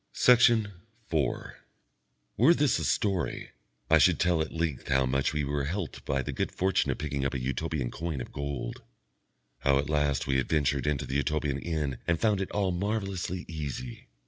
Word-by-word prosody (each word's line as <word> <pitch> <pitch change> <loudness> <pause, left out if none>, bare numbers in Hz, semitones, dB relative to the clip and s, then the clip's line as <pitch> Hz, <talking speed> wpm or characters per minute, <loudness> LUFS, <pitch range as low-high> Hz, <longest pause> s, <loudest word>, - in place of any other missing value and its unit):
Section 115 -4 +5 0.4
4 75 -5 -1 0.8
Were 170 - +6
this 145 -4 +2
a - - -3
story, 95 -6 -1 0.4
I - - +5
should - - +4
tell 90 -2 +2
at 80 - -3
length 80 -5 -2
how 65 0 +3
much 70 +1 +1
we 75 -1 -1
were 70 0 -1
helped 85 +2 -4
by 70 -1 0
the - - -4
good - - -2
fortune 95 0 +1
of - - 0
picking 70 -2 -3
up 70 +1 -1
a - - -1
Utopian 65 +1 -2
coin 80 -4 -4
of - - -7
gold, 70 -4 -4 0.8
how 70 +1 +3
at 75 +2 -1
last 75 -2 +1
we 70 -2 +1
adventured 70 -1 0
into 75 -3 0
the 70 - -1
Utopian 75 -1 0
inn 75 -6 -2
and 85 -1 +1
found 105 0 +2
it 95 - -3
all 100 -2 0
marvellously 95 -1 -2
easy. 70 -6 -6
75 Hz, 180 wpm, -29 LUFS, 70-90 Hz, 0.8 s, Were